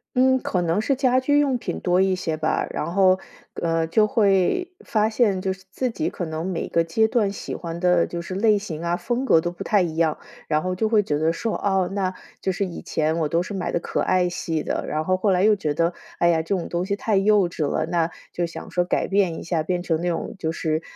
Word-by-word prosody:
嗯， 260 +1 +4
可 180 - -1
能 170 +5 +1
是 275 - +1
家 255 -1 +2
居 290 +2 +3
用 275 -3 +2
品 235 - -4
多 180 +1 +2
一 190 0 +3
些 160 -3 -2
吧。 155 0 0
然 170 +3 -3
后， 185 -1 +5 0.4
呃， 165 -1 +1
就 215 +6 +3
会 210 - +2
发 215 0 +1
现 215 -5 +2
就 190 0 -1
是 190 - -16
自 255 +3 -1
己 315 +8 -2
可 175 - -5
能 160 +1 -4
每 185 -3 -2
个 165 - +2
阶 220 +7 +2
段 220 -4 +1
喜 - - -6
欢 170 -1 -6
的 180 -1 +3
就 170 0 -5
是 185 +2 -6
类 210 +1 +4
型 170 -6 -6
啊、 170 +1 0
风 245 +6 -2
格 165 -11 +5
都 175 - -2
不 - - -7
太 205 -3 +3
一 165 -3 -2
样。 160 -2 +1 0.3
然 155 0 +2
后 185 0 -2
就 215 +3 0
会 215 -2 +4
觉 150 -7 -1
得 160 +2 +2
说： 225 +6 -2
“哦， 190 -2 +1
那， 190 -2 -1 0.3
就 190 - 0
是 195 +2 -1
以 175 - -7
前 160 -1 -1
我 155 -2 0
都 165 +2 +2
是 185 - -5
买 190 -2 -2
的 - - 0
可 - - -2
爱 185 -1 +2
系 165 -3 -2
的。” - - -2
然 155 +1 -2
后 185 - +2
后 195 +1 +1
来 185 +1 +2
又 215 -1 +5
觉 150 -6 -2
得： 170 +3 +1 0.3
“哎 170 - +4
呀， 165 -1 +3
这 175 +5 -1
种 175 - -4
东 175 +1 -2
西 200 +1 -1
太 210 0 0
幼 200 -1 +4
稚 160 -3 -2
了。” - - 0
那， 170 -1 +1 0.2
就 175 - -1
想 165 - -8
说 180 - +1
改 180 - 0
变 190 -4 +1
一 - - -8
下， 165 -2 -1
变 175 +2 -1
成 165 -2 -1
那 175 - 0
种 165 - -3
就 160 -3 -2
是， 160 -1 -1
180 Hz, 280 characters per minute, -23 LUFS, 165-205 Hz, 0.4 s, 后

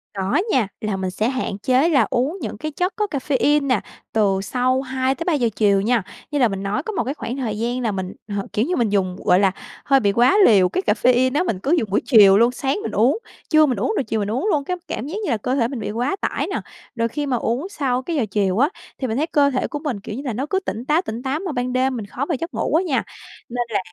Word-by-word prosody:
Có 195 - +1
nha, 240 -6 +2
là 210 -2 -2
mình 190 -1 -2
sẽ 215 +5 0
hạn 255 -6 -3
chế 260 +9 +2
là 285 -5 +3
uống 275 +9 0
những - - -5
cái 310 0 -4
chất 360 +6 -1
có 420 -1 0
caffeine 285 +1 +1
nè, 255 -6 +2 0.3
từ 200 -3 +2
sau 255 +4 +1
2:00-3:00 265 +1 0
chiều 200 -2 +3
nha. 230 0 +1 0.3
Như 290 - 0
là 250 - +5
mình 195 -2 -4
nói 205 +8 -1
có 440 - -4
một 305 - 0
cái 260 +4 -3
khoảng 255 -3 -5
thời 220 -6 -3
gian 240 +2 -1
là 230 -3 0
mình 190 -1 -4
h 205 -1 -3
kiểu 215 - +1
như 360 +4 -1
mình 235 -3 +1
dùng, 190 -3 0
gọi 180 - +5
là, 195 -1 +3 0.3
hơi 275 -1 +4
bị 205 -5 +2
quá 245 - +4
liều 190 -5 +5
cái 370 - -2
caffeine 250 +4 +3
á, 345 - +3
mình 220 - -2
cứ 270 +9 -2
dùng 220 - -3
buổi 195 - +1
chiều 205 -6 +7
luôn, 235 +3 +4
sáng 270 +2 -1
mình - - -3
uống, 245 - +2 0.3
trưa 310 -1 +6
mình 255 -6 -1
uống, 230 - 0
rồi - - +1
chiều 220 -2 -2
mình 205 0 -2
uống 260 - -1
luôn, 295 -4 +1
cái 360 +5 -3
cảm 260 - -4
giác 325 - -5
như - - -2
là 230 - +1
cơ 250 +5 -2
thể 235 -4 +2
mình 250 0 -5
bị 210 - -4
quá 245 - -1
tải - - -1
nè. - - -3 0.3
Rồi 230 -1 +1
khi 290 +5 -3
mà 260 -3 0
uống 245 - -2
sau 265 -9 -1
cái 325 +6 -4
giờ 265 -7 +1
chiều 195 -2 +1
á, 280 +4 +4 0.3
thì 260 - -2
mình 225 0 -2
thấy 305 +3 0
cơ 290 -3 +3
thể 260 -2 -1
của 295 - -5
mình, 290 -9 -3
kiểu 210 +1 -7
như 265 - -5
là, 250 - -2
nó 255 +6 -2
cứ 380 - +1
tỉnh 240 - -5
táo, 305 +5 +2
tỉnh 235 -8 -6
táo, 270 +3 -1
mà 370 -2 -4
ban 250 -2 -2
đêm 260 +1 +1
mình 225 -4 -4
khó 245 +7 -4
vào 325 - -1
giấc 335 +2 -5
ngủ - - -1
á 340 - +3
nha. 295 -8 0 0.5
Nên 245 0 -1
là 220 - 0
250 Hz, 280 wpm, -21 LUFS, 215-285 Hz, 0.5 s, chiều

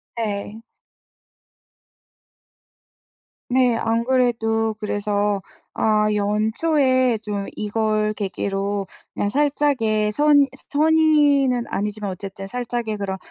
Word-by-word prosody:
네. 215 -1 -4 2.9
네, 250 -2 +3
안 230 +1 0
그래도 225 -3 +1
그래서 205 -1 -1 0.3
아 215 -1 +2
연초에 245 +5 +1
좀 205 -2 -3
이걸 215 0 0
계기로 200 0 -3 0.3
그냥 205 - -1
살짝의 265 -6 +1
선 290 +3 +4 0.2
선의는 295 -5 +3
아니지만 210 0 -3
어쨌든 195 +1 -8
살짝의 240 -1 -3
그런 195 -1 -3
220 Hz, 180 characters per minute, -22 LUFS, 205-255 Hz, 2.9 s, 선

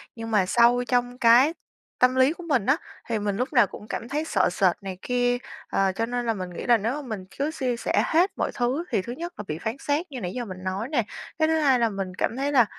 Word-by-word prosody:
nhưng 225 -1 -6
mà 205 -4 +3
sâu 240 +5 +4
trong 245 0 0
cái 250 +5 +6 0.5
tâm 250 +1 +4
lý 260 +3 +4
của 355 - -11
mình 270 -11 +1
á 275 +6 +3 0.3
thì 225 -2 0
mình 205 -1 -2
lúc 250 +6 -2
nào 240 - +5
cũng 210 - -11
cảm 230 - -5
thấy 300 +3 -1
sợ 190 - +2
sệt 180 0 +2
này 190 -2 -6
kia, 245 0 +1 0.3
ờ, 195 -1 +2
cho 225 - 0
nên 245 +1 -3
là 230 - +1
mình 185 -3 -5
nghĩ 175 - -7
là 240 -1 +5
nếu 225 +3 -1
mà 300 - -4
mình 210 -5 -5
cứ 285 +3 0
chia 255 -6 -1
sẻ - - +1
hết 350 +4 +3
mọi - - -1
thứ 255 +6 0
thì - - +2
thứ 235 +6 -6
nhất 345 +6 -6
là - - -5
bị 155 - -3
phán 220 +8 -4
xét 300 +5 -1
như 260 - -6
nãy 180 -1 -4
giờ 245 +1 -3
mình 185 -3 -8
nói 190 +4 -2
nè. 270 -6 +1 0.4
Cái 315 - +4
thứ 320 0 +2
hai 270 -5 +4
là 230 -1 +3
mình 195 -3 -4
cảm 235 - -1
thấy 280 +2 0
là 250 -5 +5
245 Hz, 270 wpm, -25 LUFS, 210-275 Hz, 0.5 s, cái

